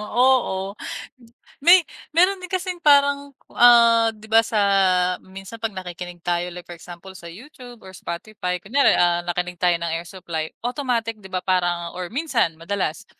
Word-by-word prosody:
oo. 210 -4 +1 0.9
May 345 +2 +6 0.3
meron 370 +4 +3
din 365 - -9
kasing 365 -2 -4
parang, 285 -1 +3 0.2
ah, 235 -1 +6
di 215 0 -15
ba, 225 +1 +4
sa 220 -1 -2 0.6
minsan 195 +4 -11
'pag 225 - -1
nakikinig 180 -1 -8
tayo 175 0 -1
like 175 0 -10
for 175 - -9
example 175 +2 -12
sa 170 -2 -11
YouTube 245 - -13
or 190 - -12
Spotify, 180 0 -5
kunyari, 235 +11 +2
ah, 175 0 +2
nakinig 180 0 -4
tayo 175 -1 +3
ng 170 -1 -3
Air 165 +1 -5
Supply, 165 -4 -5 0.2
automatic 235 -4 -3
di 190 - -12
ba, 185 - -2
parang 175 -2 -1
or 180 -1 -6
minsan 245 - -1
madalas, 170 -2 -3
195 Hz, 160 wpm, -22 LUFS, 175-245 Hz, 0.9 s, May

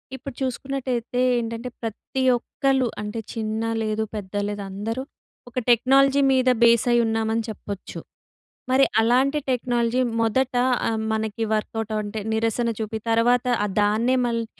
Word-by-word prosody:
ఇప్పుడు 265 0 -8
చూసుకున్నట్టయితే 255 -2 -2 0.2
ఏంటంటే, 230 +1 -4
ప్రతి 235 +4 -4
ఒక్కలు 265 +1 0
అంటే 210 +2 -4
చిన్న 220 -1 -3 0.2
లేదు, 215 0 -1
పెద్ద 200 -2 -7
లేదు. 205 0 -4
అందరూ 225 +6 -4 0.5
ఒక 245 - -2
టెక్నాలజీ 270 +4 +4
మీద 255 -1 +3
బేస్ 235 -1 +5
అయ్యున్నామని 225 -1 +1
చెప్పొచ్చు. 200 -2 -7 0.7
మరి 265 +1 +5 0.2
అలాంటి 255 +6 +3
టెక్నాలజీ 240 -1 0 0.2
మొదట 250 +3 +1 0.3
ఆహ్, 225 -1 -1
మనకి 220 0 -2
వర్క్‌అవుట్ 220 0 -3
అంటే 210 +1 -4
నిరసన 225 +1 0
చూపి, 220 0 -3
తర్వాత 240 +2 +3 0.3
దాన్నే 220 +5 +2
మళ్ళీ 230 -1 -1
230 Hz, 125 wpm, -23 LUFS, 220-255 Hz, 0.7 s, బేస్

